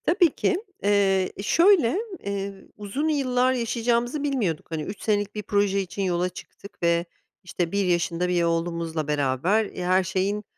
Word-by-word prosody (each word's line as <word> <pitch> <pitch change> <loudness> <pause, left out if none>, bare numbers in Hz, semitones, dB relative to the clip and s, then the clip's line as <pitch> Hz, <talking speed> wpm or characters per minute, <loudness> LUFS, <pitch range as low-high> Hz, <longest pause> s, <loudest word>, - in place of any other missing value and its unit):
Tabii 350 0 +4
ki, 375 - +1 0.3
eee, 195 -2 +3
e, 195 - -5
şöyle, 335 - +4 0.3
eee, 200 -1 -4
uzun 210 +9 -3
yıllar 255 -4 +2
yaşayacağımızı 240 +3 0
bilmiyorduk. 225 - -1
Hani 160 -2 -2
3 200 +6 -7
senelik 205 -1 0
bir 210 - -4
proje 200 -1 +1
için 190 +1 -5
yola 180 -1 0
çıktık 180 +1 -13
ve, 170 0 +2 0.4
işte, 175 -2 -3
1 200 -1 +1
yaşında 175 0 0
bir 175 -1 +2
oğlumuzla 165 -2 -1
beraber, 150 - +1
e, 180 -3 -6
her 185 +1 +3
şeyin 190 +3 -1
195 Hz, 160 wpm, -25 LUFS, 175-230 Hz, 0.4 s, Tabii